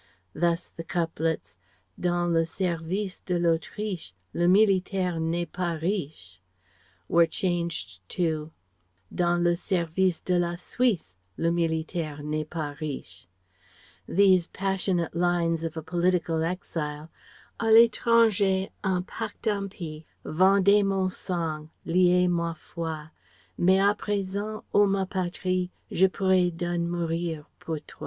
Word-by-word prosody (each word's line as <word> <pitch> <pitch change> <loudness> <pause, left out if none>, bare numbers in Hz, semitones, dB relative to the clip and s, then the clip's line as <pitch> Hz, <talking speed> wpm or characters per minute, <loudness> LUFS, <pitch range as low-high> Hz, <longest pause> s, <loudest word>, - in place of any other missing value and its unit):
Thus 170 +1 0
the 165 - -9
couplets 160 - -2 0.4
"Dans 175 -1 +1
le 165 0 +4
service 180 +3 -2
de 180 -1 -2
l'Autriche 170 - -1 0.2
Le 175 0 +2
militaire 190 -2 +3
n'est 165 +2 0
pas 175 -1 -1
riche" 150 - -4 0.7
were 170 0 +5
changed 170 - -2
to 160 -3 -1 0.6
"Dans 175 -1 +2
le 175 0 +3
service 175 -1 0
de 180 -1 +1
la 175 0 0
Suisse 205 - 0 0.2
Le 165 - +1
militaire 160 -2 -2
n'est 155 0 -3
pas 150 -4 -4
riche." 150 -10 -6 0.8
These 185 -2 +4
passionate 190 -3 -1
lines 170 -1 +1
of 165 0 -4
a 160 - -4
political 175 -1 +1
exile: 160 -3 -4 0.5
"A 230 - -2
l'étranger 220 -4 +4
un 185 -2 +1
pacte 215 +3 -7
impie 190 -7 -3 0.2
Vendait 195 +4 +5
mon 195 -1 +1
sang, 160 -5 -3 0.2
liait 180 +1 +4
ma 170 -1 0
foi, 160 -1 -6 0.4
Mais 185 +2 +4
à 200 +1 +4
present, 205 +1 -3
o 205 0 +6
ma 195 -1 +1
patrie 185 -1 -1 0.2
Je 190 +2 +5
pourrai 185 -1 +2
done 175 0 -2
mourir 165 -2 -2
pour 160 -1 -4
toi!" - - -15
175 Hz, 120 wpm, -27 LUFS, 165-190 Hz, 0.8 s, o